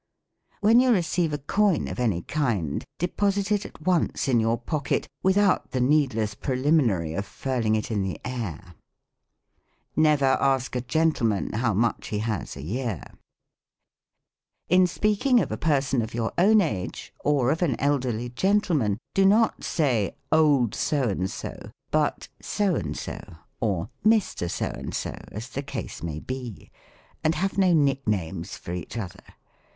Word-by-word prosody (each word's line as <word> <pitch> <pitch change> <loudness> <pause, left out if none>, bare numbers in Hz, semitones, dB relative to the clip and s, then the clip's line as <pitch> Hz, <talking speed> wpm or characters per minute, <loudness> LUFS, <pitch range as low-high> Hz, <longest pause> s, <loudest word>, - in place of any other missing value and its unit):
When 225 +3 +6
you 255 0 +4
receive 175 -4 +1
a 150 - -1
coin 195 +5 +1
of - - -5
any 105 -9 0
kind, 115 - -1
deposit 200 +3 0
it 205 -1 +1
at - - -16
once 175 -4 +1
in 125 -3 +3
your 115 +1 +1
pocket, 140 +4 -2
without 195 +1 +3
the 130 - 0
needless 125 -6 +2
preliminary 125 - +1
of 100 - -2
furling 115 -1 -1
it 110 +1 -2
in 105 -2 0
the 95 -1 -3
air. 100 -8 -5 1.2
Never 150 -3 +4
ask 135 -1 +2
a 125 - 0
gentleman 120 -6 +1
how 110 -1 +1
much 115 +2 0
he 105 - -2
has 105 -7 -3
a 70 - -7
year. 110 - -3 1.7
In 180 +2 +5
speaking 215 +7 +2
of - - -1
a - - -1
person 135 -5 +1
of 110 0 -5
your 115 -1 -1
own 210 +4 +5
age, 105 - -4
or 140 -3 +2
of 160 - -1
an 155 -9 +1
elderly 125 -4 0
gentleman, 155 - +1 0.2
do 195 - +3
not 215 +4 +3
say. 125 - 0 0.2
Old 145 -7 +4
So 140 -6 0
and 95 -1 -1
so, - - -7 0.2
but - - 0
So 205 -3 0
and 75 - -3
so, - - -5 0.4
or 100 -3 -1
Mr. 215 - +2
So - - -2
and - - -5
so, - - -3 0.2
as 110 +5 -7
the 135 - -4
case 135 -5 -6
may 80 -2 -4
be: 125 0 -7 0.5
and 160 +1 +2
have 195 +1 -1
no 185 -2 +4
nicknames 105 - 0
for 85 - -7
each 90 +6 -6
other. 100 -6 -6
130 Hz, 155 wpm, -25 LUFS, 110-165 Hz, 1.7 s, When